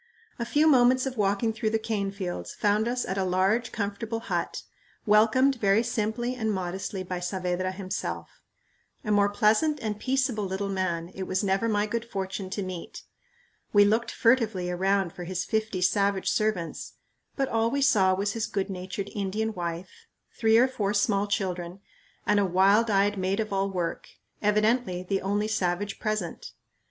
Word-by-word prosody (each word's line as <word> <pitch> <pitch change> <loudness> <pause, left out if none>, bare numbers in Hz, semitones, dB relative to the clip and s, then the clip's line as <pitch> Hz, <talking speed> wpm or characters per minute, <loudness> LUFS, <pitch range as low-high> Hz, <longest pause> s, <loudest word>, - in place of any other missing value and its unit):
A 235 - -1
few 295 +6 +2
moments 255 -3 +5
of 265 -1 -3
walking 205 +1 +1
through 220 0 -1
the 225 - +1
cane 215 -3 -2
fields 190 -3 -5
found 210 +2 +1
us 245 +1 -1
at 190 +1 -2
a - - +1
large 190 +6 +1
comfortable 225 +2 -3
hut, - - -3 0.4
welcomed 225 +6 +4
very 200 +2 +4
simply 225 +2 -1
and 220 -3 -1
modestly 190 0 -3
by 180 -1 -4
Saavedra 180 0 -2
himself. 190 0 -5 0.6
A 215 - -2
more 205 -1 +4
pleasant 220 +9 +2
and 210 -2 -3
peaceable 255 -5 0
little 195 +1 -3
man 180 -3 -2
it 190 -1 -5
was 185 +2 0
never 195 +3 +1
my 205 -1 +1
good 230 +2 -2
fortune 195 -3 -4
to 195 +1 -3
meet. 185 -2 -7 0.7
We 205 -1 +7
looked 220 +3 +1
furtively 225 -7 +2
around 190 0 +1
for 175 - -7
his 185 +1 -3
fifty 220 -4 -1
savage 200 +1 +2
servants, 215 -6 -2 0.4
but 270 -2 0
all 225 -1 +1
we 280 +2 0
saw 195 -9 +4
was 200 +2 -1
his 225 +1 -2
good 195 -1 -2
natured 190 +2 -5
Indian 210 +2 -2
wife, 175 - -6 0.3
three 225 -1 +4
or 250 +3 +6
four 210 -5 -2
small 205 0 +2
children, 180 -2 -2 0.5
and 210 0 +3
a - - +3
wild 195 +5 +4
eyed 200 0 +2
maid 190 +3 0
of 215 -2 -2
all 195 0 +1
work, 180 -3 -3 0.3
evidently 210 -2 +1
the 195 +1 -1
only 205 +2 0
savage 195 -1 -1
present. 215 -6 -3
205 Hz, 170 wpm, -27 LUFS, 190-225 Hz, 0.7 s, We